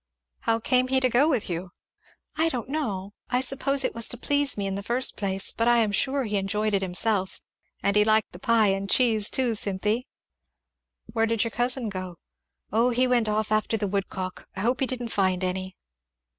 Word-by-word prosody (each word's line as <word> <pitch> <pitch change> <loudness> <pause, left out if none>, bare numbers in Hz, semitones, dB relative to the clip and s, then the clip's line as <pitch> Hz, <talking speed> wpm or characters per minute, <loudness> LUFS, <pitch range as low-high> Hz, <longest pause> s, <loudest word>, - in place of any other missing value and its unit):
"How 225 0 +1
came 255 +2 +2
he 265 0 +2
to 255 -1 +2
go 250 +5 +4
with 255 -8 0
you?" 175 +1 -5 0.6
"I 320 +1 +2
don't 250 -4 -4
know, 205 -10 -3 0.2
I 250 - +1
suppose 270 +1 +1
it - - -1
was 230 -1 0
to 245 - -3
please 285 +1 +1
me, 200 - -1
in 195 - -1
the 200 - -3
first 240 +5 +1
place; 195 -1 -1
but 230 - 0
I 240 0 +5
am 220 -3 +2
sure 270 +6 +1
he 210 -3 -1
enjoyed 210 +2 -1
it 195 - +2
himself; 190 +1 -1 0.4
and 200 - +2
he 210 - +6
liked 215 0 +2
the 175 - -11
pie 225 0 +3
and 195 0 -1
cheese, 220 -4 +3
too, 250 -3 +1
Cynthy." 210 +3 -1 1.1
"Where 225 -1 +2
did 230 -1 +1
your 230 - -3
cousin 245 +1 0
go?" 185 -2 -6 0.6
"O 230 +4 +3
he 250 +1 +2
went 240 -3 +2
off 215 0 -1
after 215 +1 +1
the 205 -1 -2
woodcock. 190 -1 -4
I 190 - -4
hope 245 +4 0
he 265 - +1
didn't 245 -2 -4
find 185 -3 +1
any." 185 0 -3
220 Hz, 205 wpm, -25 LUFS, 195-250 Hz, 1.1 s, he